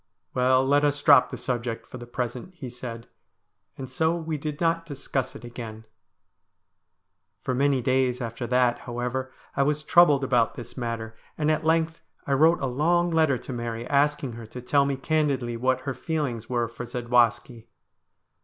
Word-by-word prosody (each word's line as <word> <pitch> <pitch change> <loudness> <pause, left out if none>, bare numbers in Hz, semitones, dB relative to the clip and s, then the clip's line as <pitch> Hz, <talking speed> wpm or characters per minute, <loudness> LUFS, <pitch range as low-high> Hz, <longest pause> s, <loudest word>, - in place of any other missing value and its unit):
' - - -52
Well, 130 +1 +3
let 145 +2 +3
us 145 0 +2
drop 145 0 +6
the - - -6
subject 120 -2 -3
for 125 - -10
the 120 - -9
present,' 125 +8 -5
he 130 -8 -7
said; 120 -2 -7 0.7
and 130 - -6
so 160 +6 +1
we 160 -2 -3
did 150 0 -5
not 165 0 +1
discuss 135 -4 -4
it - - -10
again. 115 -2 -8 1.6
For 130 - -1
many 135 0 +2
days 130 -1 +1
after 120 0 -4
that, 125 -1 +2
however, 125 +2 -4 0.2
I - - +2
was 150 +2 +1
troubled 150 -4 +5
about 125 -4 +2
this 120 - -9
matter, 115 -2 -4 0.2
and 155 0 +2
at 155 0 -1
length 160 0 +1 0.2
I 140 - 0
wrote 160 +5 +4
a - - 0
long 170 +7 +1
letter 160 -5 +3
to 130 - -8
Mary 120 -1 -4
asking 145 -2 +1
her 115 -1 -9
to 125 - -8
tell 140 +3 +2
me 140 - 0
candidly 135 -5 0
what 130 +2 +1
her 135 0 -3
feelings 130 -5 -3
were 120 -2 0
for 115 +1 -8
Zadwaski. 120 -1 +1
130 Hz, 175 wpm, -26 LUFS, 120-150 Hz, 1.6 s, drop